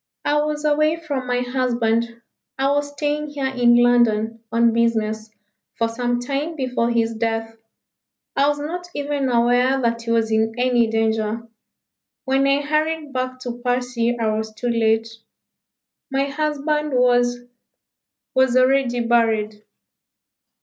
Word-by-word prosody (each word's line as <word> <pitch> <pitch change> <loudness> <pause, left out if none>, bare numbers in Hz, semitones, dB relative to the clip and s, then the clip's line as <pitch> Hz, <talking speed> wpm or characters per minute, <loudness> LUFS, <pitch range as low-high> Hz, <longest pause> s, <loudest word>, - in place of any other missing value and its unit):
"I 295 0 +2
was 300 0 -3
away 305 +1 +2
from 290 -6 -4
my 245 0 0
husband. 235 -2 -1 0.3
I 270 +1 +1
was 285 0 0
staying 295 +1 -2
here 285 -2 -4
in 245 -2 +3
London 230 -2 +3
on 230 0 +3
business 220 -2 0 0.5
for 230 - +1
some 240 +1 -2
time 280 +6 -3
before 250 -4 -1
his 230 -1 +1
death. 225 0 -2 0.8
I 280 +1 +3
was 290 - -1
not 345 +5 -5
even 285 -2 -1
aware 245 +2 +3
that 235 -2 0
he 230 - -7
was 225 -1 +1
in 220 0 +1
any 245 -2 +2
danger. 225 0 -1 0.8
When 270 0 +2
I 275 +1 +2
hurried 305 0 -1
back 255 0 -3
to 245 -2 -6
Passy 245 -1 0
I 220 -2 0
was 220 0 -3
too 245 +3 -3
late. 225 -1 +2 1.0
My 270 0 +1
husband 300 0 -1
was 245 -1 +3 1.0
was 260 -1 +3
already 255 -1 +2
buried." 220 -3 +1
245 Hz, 135 wpm, -21 LUFS, 230-280 Hz, 1.0 s, in